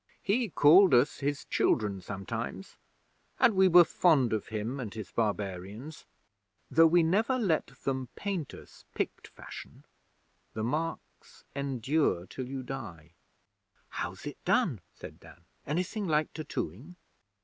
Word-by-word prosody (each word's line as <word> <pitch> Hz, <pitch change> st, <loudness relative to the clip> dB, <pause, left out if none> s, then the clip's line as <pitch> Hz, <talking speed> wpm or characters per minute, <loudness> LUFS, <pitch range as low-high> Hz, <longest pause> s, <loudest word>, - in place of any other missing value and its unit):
He 220 Hz, +3 st, +1 dB
called 170 Hz, +1 st, +6 dB
us 125 Hz, +4 st, +3 dB
his 145 Hz, 0 st, -2 dB
children 100 Hz, -4 st, +1 dB
sometimes, 110 Hz, -, -6 dB, 0.6 s
and 250 Hz, -4 st, +5 dB
we 190 Hz, 0 st, +6 dB
were 175 Hz, -1 st, +8 dB
fond 155 Hz, -8 st, +3 dB
of 110 Hz, -, -2 dB
him 110 Hz, +5 st, -4 dB
and 115 Hz, -5 st, -5 dB
his 110 Hz, -2 st, -8 dB
barbarians, 105 Hz, -, -3 dB, 0.6 s
though 165 Hz, +1 st, +7 dB
we 170 Hz, +1 st, +4 dB
never 220 Hz, +10 st, +2 dB
let 185 Hz, -10 st, +1 dB
them 130 Hz, -2 st, -4 dB
paint 190 Hz, -8 st, -3 dB
us -, -, -15 dB
Pict -, -, -3 dB
fashion. -, -, -11 dB, 0.7 s
The 110 Hz, -, -2 dB
marks 160 Hz, +7 st, -4 dB
endure 140 Hz, -, 0 dB
till 125 Hz, +7 st, -7 dB
you 135 Hz, -1 st, -5 dB
die.' 100 Hz, -, -8 dB, 0.8 s
'How's -, -, -5 dB
it -, -, -8 dB
done?' -, -, +1 dB
said -, -, -11 dB
Dan. 85 Hz, -, -17 dB, 0.2 s
'Anything 185 Hz, +7 st, -2 dB
like 155 Hz, -1 st, +1 dB
tattooing?' 150 Hz, -, -5 dB
140 Hz, 130 wpm, -30 LUFS, 110-170 Hz, 0.8 s, were